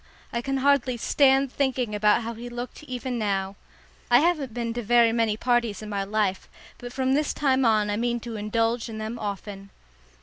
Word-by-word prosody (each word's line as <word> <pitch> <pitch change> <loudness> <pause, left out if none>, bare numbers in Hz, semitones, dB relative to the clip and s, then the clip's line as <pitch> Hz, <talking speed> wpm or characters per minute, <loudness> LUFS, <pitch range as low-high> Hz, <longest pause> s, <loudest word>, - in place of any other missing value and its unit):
I 235 - -1
can 270 +2 -2
hardly 265 -2 +2
stand 270 +2 +3
thinking 255 -5 -1
about 210 +2 +3
how 230 +1 -4
he 235 +2 -8
looked 240 +3 -7
even 255 -2 -4
now. 195 -2 -1 0.5
I 240 - +7
haven't 305 -5 +1
been 230 0 -3
to 240 - -3
very 235 +1 +4
many 225 -2 +1
parties 235 -4 0
in 215 - -7
my 200 -1 -2
life, 200 -2 -1 0.3
but 245 0 -8
from 260 +1 0
this 295 +1 0
time 270 -2 +2
on 215 -2 +3
I 205 - -1
mean 240 +1 0
to 235 -1 -6
indulge 225 +3 -1
in 220 - -6
them 220 +2 -5
often. 200 -1 -6
235 Hz, 195 wpm, -25 LUFS, 215-255 Hz, 0.5 s, I